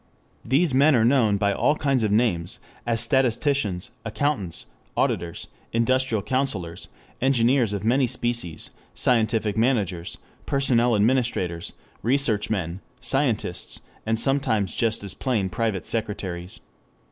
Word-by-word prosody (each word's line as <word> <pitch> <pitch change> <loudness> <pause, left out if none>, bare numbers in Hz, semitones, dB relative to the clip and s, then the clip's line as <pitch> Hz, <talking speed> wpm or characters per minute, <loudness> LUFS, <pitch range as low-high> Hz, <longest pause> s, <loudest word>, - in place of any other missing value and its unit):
These 140 +5 +2
men 140 +3 +5
are 115 -2 +4
known 115 -5 +3
by 100 0 +1
all 150 - +2
kinds 140 -4 +1
of 110 -2 +1
names, 105 -7 +1 0.3
as 115 -1 +2
statisticians, 120 - +1
accountants, 115 - -2 0.3
auditors, 85 -1 -1 0.3
industrial 115 -2 +1
counsellors, 105 -11 -2 0.3
engineers 125 -2 +3
of 100 0 -3
many 130 +3 +3
species, 120 -10 -3 0.2
scientific 110 -3 +1
managers, 105 -8 0 0.3
personnel 125 -4 +3
administrators, 105 -7 0 0.3
research 120 -3 +1
men, 95 -3 -2 0.2
"scientists," 120 -10 -1 0.2
and 110 0 0
sometimes 115 - +1
just 115 -2 0
as 100 - -5
plain 110 -8 -1
private 100 -2 -2
secretaries. 95 -5 -3
115 Hz, 115 wpm, -24 LUFS, 100-130 Hz, 0.3 s, men